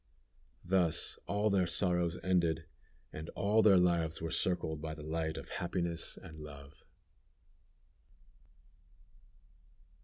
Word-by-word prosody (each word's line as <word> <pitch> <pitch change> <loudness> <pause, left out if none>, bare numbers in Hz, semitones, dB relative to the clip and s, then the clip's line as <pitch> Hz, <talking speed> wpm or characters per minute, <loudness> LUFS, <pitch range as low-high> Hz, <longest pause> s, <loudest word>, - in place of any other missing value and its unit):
Thus 90 -2 +1
all 105 +1 +1
their 95 -3 +3
sorrows 90 0 +1
ended, 85 -3 +2 0.5
and 80 +1 -6
all 105 +2 +3
their 100 -3 +7
lives 85 -3 +2
were 80 -1 -4
circled 80 -4 -1
by 80 0 -4
the 75 - -9
light 80 0 -2
of - - -7
happiness 85 -1 -2
and 80 - -11
love. 70 -2 -11
85 Hz, 110 wpm, -34 LUFS, 80-90 Hz, 0.5 s, their